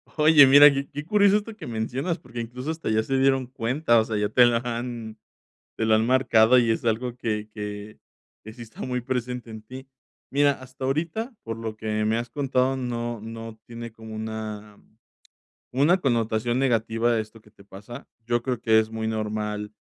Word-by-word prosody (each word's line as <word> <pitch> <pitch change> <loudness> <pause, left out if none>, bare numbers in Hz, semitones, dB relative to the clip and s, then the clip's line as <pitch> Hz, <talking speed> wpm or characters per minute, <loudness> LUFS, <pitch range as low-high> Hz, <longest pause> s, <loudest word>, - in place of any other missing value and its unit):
Oye, 150 -2 +7
mira 145 +2 +9
qué 140 0 -3
qué 145 +1 -6
curioso 205 +2 +4
esto 210 +1 -6
que 215 - -9
mencionas 125 +9 -2
porque, 120 -1 -9
incluso, 125 +6 -5
hasta 160 -5 -4
ya 110 0 +2
se 135 +3 -1
dieron 135 -1 +2
cuenta, 125 0 +1
o 110 - +1
sea, 110 -2 -3
ya 105 0 0
te 125 +2 +6
la 120 -1 +3
han 120 -2 -5 0.6
te 110 - -1
la 110 - +5
han 110 +1 +1
marcado 125 -2 +4
y 120 -2 +3
es 115 - -1
algo 120 +2 -1
que 110 -3 -3
que 105 0 -7 0.5
que 110 - -9
sí 120 +1 -11
está 110 -1 -10
muy 125 -1 -2
presente 125 -1 -4
en 110 -1 -9
ti. 130 +4 -11 0.4
Mira, 145 +1 +3
hasta 130 0 -10
ahorita, 170 - -2
por 115 -1 -4
lo 110 -1 -6
que 110 0 -2
me 110 +1 +1
has 120 0 -5
contado, 135 -1 0
no 120 -2 -4
no 115 0 -8
tiene 115 0 -8
como 110 -1 -10
una, 110 -1 -6 1.0
una 150 +8 +4
connotación 120 -2 0
negativa 115 -2 +1
de 115 - +1
esto 110 +1 -12
que 105 - -22
te 100 - -19
pasa. 105 +7 -11 0.2
Yo 120 0 0
creo 125 -1 -2
que 110 -1 +4
es 110 - -1
muy 110 0 -4
normal 105 -1 -3
120 Hz, 195 wpm, -25 LUFS, 110-130 Hz, 1.0 s, mira